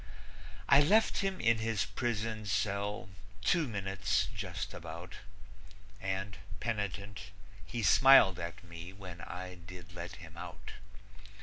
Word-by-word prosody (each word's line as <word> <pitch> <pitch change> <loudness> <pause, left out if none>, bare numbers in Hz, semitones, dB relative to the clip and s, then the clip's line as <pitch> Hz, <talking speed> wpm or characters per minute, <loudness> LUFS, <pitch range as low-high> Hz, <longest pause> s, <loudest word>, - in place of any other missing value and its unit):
I 140 - +8
left 210 +9 +4
him 195 -1 -1
in 115 -1 +3
his 110 -3 0
prison 110 0 -2
cell 100 -1 -1 0.3
two 165 +5 +3
minutes, 95 -3 0
just - - -4
about, 85 +2 -8 0.8
And, 95 +1 -2 0.2
penitent, 100 -2 -3 0.3
he 120 -2 -4
smiled 120 -7 +7
at 85 +1 -6
me 85 +1 -9
when 90 -3 -9
I 90 0 -6
did 90 0 -11
let 85 0 -6
him - - -12
out. - - -8
100 Hz, 120 wpm, -33 LUFS, 90-110 Hz, 0.8 s, I